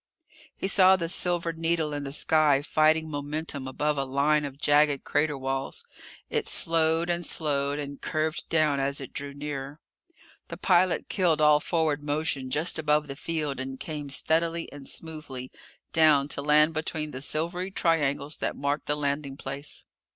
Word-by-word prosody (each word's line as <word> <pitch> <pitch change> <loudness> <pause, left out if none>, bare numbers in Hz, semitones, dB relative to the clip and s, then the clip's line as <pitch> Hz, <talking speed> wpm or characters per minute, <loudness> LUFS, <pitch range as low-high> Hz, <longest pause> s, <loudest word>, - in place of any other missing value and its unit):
He - - -2
saw 190 -1 +6
the 170 -3 -2
silver 175 -1 +2
needle 165 -2 -1
in 145 -1 -4
the 135 - -5
sky 150 -1 +3
fighting 155 +1 +3
momentum 145 -1 -4
above 145 +2 -1
a - - +1
line 145 +3 +1
of 140 -1 -7
jagged 145 -1 +3
crater 150 0 0
walls. 135 - -3 0.4
It 450 -2 -1
slowed, 165 0 +2
and 175 0 -1
slowed, 145 -3 0
and 140 -1 -6
curved 155 +1 -2
down 155 -3 +2
as 140 +1 0
it 135 - -9
drew 140 0 -5
nearer. 145 0 -6 0.7
The - - -7
pilot 185 -1 +2
killed 175 -6 +1
all 150 -1 +5
forward 155 -2 0
motion 145 -3 -1
just 155 +5 -1
above 150 -1 +1
the 140 - -6
field 150 -2 -3
and 130 0 -5
came 150 -3 -5
steadily 165 +4 +1
and 145 -1 -9
smoothly 150 -6 -6 0.4
down 155 -3 +5
to 140 - -2
land 150 +2 +4
between 155 -1 -3
the 130 - -7
silvery 170 +6 -2
triangles 150 -5 0
that - - -2
marked 145 +1 -2
the 145 - 0
landing 140 -1 -2
place. 140 +2 -7
150 Hz, 165 wpm, -27 LUFS, 140-160 Hz, 0.7 s, saw